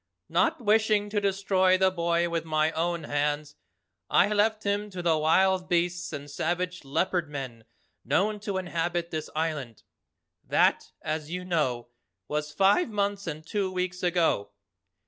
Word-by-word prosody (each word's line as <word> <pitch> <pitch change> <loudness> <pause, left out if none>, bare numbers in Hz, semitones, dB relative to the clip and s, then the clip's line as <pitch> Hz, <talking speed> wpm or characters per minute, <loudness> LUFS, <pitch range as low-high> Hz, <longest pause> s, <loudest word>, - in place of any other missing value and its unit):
Not - - +2
wishing 215 -2 +2
to 205 -1 0
destroy 190 -1 +2
the 190 0 +3
boy 170 -1 +1
with 170 -1 -2
my 155 -1 +1
own 170 0 -1
hands, 145 +1 -1 0.6
I - - +4
left 215 +1 +1
him 205 +1 -1
to 185 -3 -6
the 165 -2 +3
wild 180 +4 +2
beasts 175 +1 0
and 145 -2 -6
savage 175 +5 -2
Leopard 170 +4 0
Men 130 -6 -6 0.4
known 205 - +1
to 200 -2 -3
inhabit 175 -1 -2
this 155 -1 -4
island. 150 -8 -3 0.6
That, - - +2
as 155 0 -3
you 180 +1 -4
know, 130 -9 -1 0.4
was 150 +2 -2
five 200 - +3
months 200 -2 -1
and 155 0 -5
two 195 +2 -1
weeks 180 0 -3
ago. 170 - +1
175 Hz, 145 wpm, -27 LUFS, 155-190 Hz, 0.6 s, I